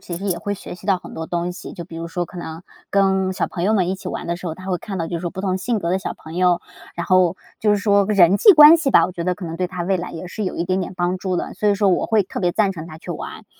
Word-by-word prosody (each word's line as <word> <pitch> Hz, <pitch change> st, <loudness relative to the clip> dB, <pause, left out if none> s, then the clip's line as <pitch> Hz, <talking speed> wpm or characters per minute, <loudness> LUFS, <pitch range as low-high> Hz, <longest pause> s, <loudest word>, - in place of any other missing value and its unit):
其 175 Hz, -, -6 dB
实 195 Hz, -, -6 dB
也 180 Hz, -3 st, -1 dB
会 205 Hz, +3 st, -3 dB
学 190 Hz, -, -9 dB
习 185 Hz, -, -13 dB
到 190 Hz, -3 st, +3 dB
很 -, -, -12 dB
多 160 Hz, -, -5 dB
东 175 Hz, +1 st, -2 dB
西。 180 Hz, -, -9 dB
就 170 Hz, -, -7 dB
比 165 Hz, -1 st, -10 dB
如 165 Hz, 0 st, -5 dB
说 175 Hz, +1 st, -2 dB
可 180 Hz, -, -11 dB
能 165 Hz, 0 st, -7 dB, 0.3 s
跟 190 Hz, -1 st, +2 dB
小 -, -, -1 dB
朋 175 Hz, -, -5 dB
友 215 Hz, +3 st, +3 dB
们 185 Hz, -4 st, +2 dB
一 190 Hz, -, 0 dB
起 190 Hz, -, -7 dB
玩 -, -, -5 dB
的 170 Hz, 0 st, -2 dB
时 180 Hz, -, -8 dB
候， 160 Hz, -, -3 dB
他 185 Hz, +2 st, -11 dB
会 185 Hz, -2 st, -1 dB
看 195 Hz, +1 st, -6 dB
到 165 Hz, -, -2 dB
就 170 Hz, -, -3 dB
是 165 Hz, -, -5 dB
说 175 Hz, -1 st, -3 dB
不 190 Hz, -, -6 dB
同 190 Hz, -1 st, -1 dB
性 230 Hz, +4 st, -1 dB
格 170 Hz, -4 st, -2 dB
的 185 Hz, -, +1 dB
小 -, -, -5 dB
朋 160 Hz, +2 st, -11 dB
友， 180 Hz, -1 st, +3 dB, 0.3 s
然 170 Hz, -, -4 dB
后 185 Hz, -1 st, +3 dB, 0.2 s
就 210 Hz, -, +2 dB
是 210 Hz, -, +4 dB
说 200 Hz, -1 st, +3 dB
人 195 Hz, -3 st, +5 dB
际 410 Hz, -, +8 dB
关 305 Hz, 0 st, +9 dB
系 310 Hz, -4 st, 0 dB
吧， -, -, +6 dB
我 180 Hz, -, -3 dB
觉 170 Hz, -2 st, -5 dB
得 180 Hz, 0 st, +1 dB
可 180 Hz, -, -8 dB
能 165 Hz, 0 st, -5 dB
对 180 Hz, -, -1 dB
他 180 Hz, -1 st, -5 dB
未 190 Hz, +2 st, +1 dB
来 175 Hz, -, -5 dB
也 165 Hz, +2 st, -7 dB
是 205 Hz, +3 st, -5 dB
有 -, -, -3 dB
一 170 Hz, -, -1 dB
点 185 Hz, +2 st, 0 dB
点 185 Hz, -, -5 dB
帮 180 Hz, +1 st, 0 dB
助 185 Hz, -1 st, -2 dB
的， -, -, -3 dB
所 210 Hz, -, 0 dB
以 200 Hz, -, +4 dB
说 200 Hz, 0 st, +2 dB
我 180 Hz, -, +1 dB
会 220 Hz, -2 st, +3 dB
特 185 Hz, -, -6 dB
别 180 Hz, -2 st, +2 dB
赞 200 Hz, -1 st, +2 dB
成 165 Hz, -2 st, -8 dB
他 155 Hz, -, -10 dB
去 175 Hz, -, -9 dB
玩。 165 Hz, -, -7 dB
185 Hz, 365 characters per minute, -21 LUFS, 175-195 Hz, 0.3 s, 关